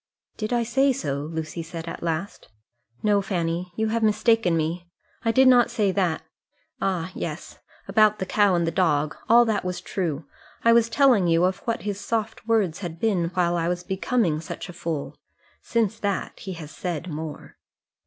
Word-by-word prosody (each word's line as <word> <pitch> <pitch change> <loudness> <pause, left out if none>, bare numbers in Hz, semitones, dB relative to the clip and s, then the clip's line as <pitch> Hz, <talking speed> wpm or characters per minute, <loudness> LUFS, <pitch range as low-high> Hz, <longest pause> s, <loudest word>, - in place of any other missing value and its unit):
"Did 215 +1 -4
I 240 -1 +2
say 265 +4 +3
so?" 140 - -3
Lucy 160 +1 -4
said 165 0 -7
at 165 - -6
last. 170 +3 -3 0.6
"No, 205 -1 +3
Fanny; 175 -2 -2
you 220 0 0
have 230 +1 0
mistaken 220 -4 +3
me: 165 +3 -2 0.4
I 230 - +2
did 260 +2 +5
not 245 -2 +6
say 210 -5 +1
that. 180 -4 0 0.6
Ah, 185 -2 -1
yes, 160 -2 -6 0.3
about 215 +1 +4
the 190 - -3
cow 200 0 +3
and 170 -1 +1
the 165 - 0
dog. 155 -4 +1
All 240 +1 +7
that 220 -3 0
was 180 -1 -3
true. 170 -5 -3 0.4
I 230 - +7
was 230 0 +4
telling 240 -7 +4
you 165 +1 +3
of 185 0 0
what 230 0 -1
his 200 -1 -3
soft 220 -1 -3
words 210 -8 +1
had 170 -4 -6
been 195 -6 +1
while 175 -1 +2
I 170 -1 0
was 175 0 -2
becoming 190 -4 0
such 165 - -7
a - - -8
fool. 165 -4 -4 0.4
Since 225 -2 0
that 200 -2 -2
he 190 - -6
has 160 -3 -9
said 175 -2 -4
more." 155 -2 -7
185 Hz, 185 wpm, -25 LUFS, 165-220 Hz, 0.6 s, All